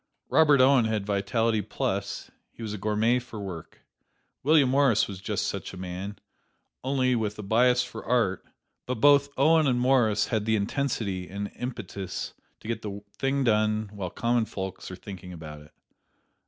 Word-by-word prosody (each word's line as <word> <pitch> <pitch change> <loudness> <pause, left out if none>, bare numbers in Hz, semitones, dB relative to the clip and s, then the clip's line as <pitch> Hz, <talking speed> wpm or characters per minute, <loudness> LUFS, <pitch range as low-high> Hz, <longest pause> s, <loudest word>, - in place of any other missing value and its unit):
Robert 150 -3 +5
Owen 130 -2 +5
had 110 -2 -1
vitality 105 +2 +1
plus: 100 0 -3 0.2
he 115 - -10
was 105 -2 -4
a 105 - -5
gourmet 110 +4 +2
for 120 -3 -9
work. 95 -5 -8 0.6
William 150 -1 +5
Morris 135 -3 +3
was 95 -2 -8
just - - -2
such - - -4
a - - -8
man, 95 +3 -6 0.7
only 130 -1 +1
with 105 -3 -2
a 105 - -6
bias 125 +4 +3
for 110 - -8
art; 115 -6 +1 0.4
but 125 - -1
both 140 +3 +5
Owen 155 +2 +5
and 125 -2 +2
Morris 125 -5 +3
had 110 -3 0
the 110 0 +2
intensity 100 -4 -2
and 100 +2 -5
impetus 105 -6 -5 0.2
which - - -13
get 115 -1 -2
the 100 -1 -6 0.2
thing 135 +1 +1
done 110 -2 +1
while 95 -3 -4
common 120 +4 +1
folks 95 -3 -6
are 95 - -6
thinking 90 -1 -9
about 75 -3 -9
it. 75 - -17
110 Hz, 170 wpm, -27 LUFS, 100-125 Hz, 0.7 s, Robert